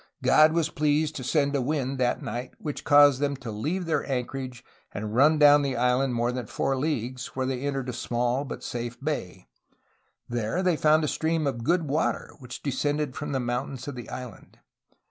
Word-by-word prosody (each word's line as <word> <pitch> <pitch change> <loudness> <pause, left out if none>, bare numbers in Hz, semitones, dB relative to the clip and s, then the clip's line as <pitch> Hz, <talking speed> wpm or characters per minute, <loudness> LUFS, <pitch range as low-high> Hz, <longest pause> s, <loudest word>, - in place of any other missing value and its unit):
''God 155 +1 +6
was 165 -1 +1
pleased' 150 +1 +1
' - - -4
to 130 - -5
send 140 +1 +1
a 140 - +1
wind 135 -1 -2
that 125 -1 0
night 125 +2 -5
which 150 -2 -5
caused 145 -2 +6
them 145 0 0
to 120 -3 -7
leave 155 - -2
their 155 -3 0
anchorage 130 -1 -4 0.3
and 105 +1 -5
run 145 +6 +5
down 145 -1 +7
the 135 -2 -1
island 125 +1 +1
more 120 +1 +1
than 125 -3 -5
four 135 - -1
leagues, 130 -3 -2
where 130 0 -1
they 130 -1 -2
entered 135 -2 -2
a 125 - -3
small 120 +2 -1
but 140 - -7
safe 120 0 -5
bay. 115 -11 -4 0.8
There 120 - -1
they 180 -3 +3
found 155 +1 +3
a - - +1
stream 160 +1 0
of 125 -5 -2
good 170 +5 +2
water, 150 +4 -1
which 125 -2 -9
descended 145 0 -1
from 150 0 -4
the 135 - 0
mountains 125 +2 -3
of 145 - -4
the 120 -2 -8
island. 125 -4 -9
135 Hz, 200 wpm, -26 LUFS, 125-150 Hz, 0.8 s, down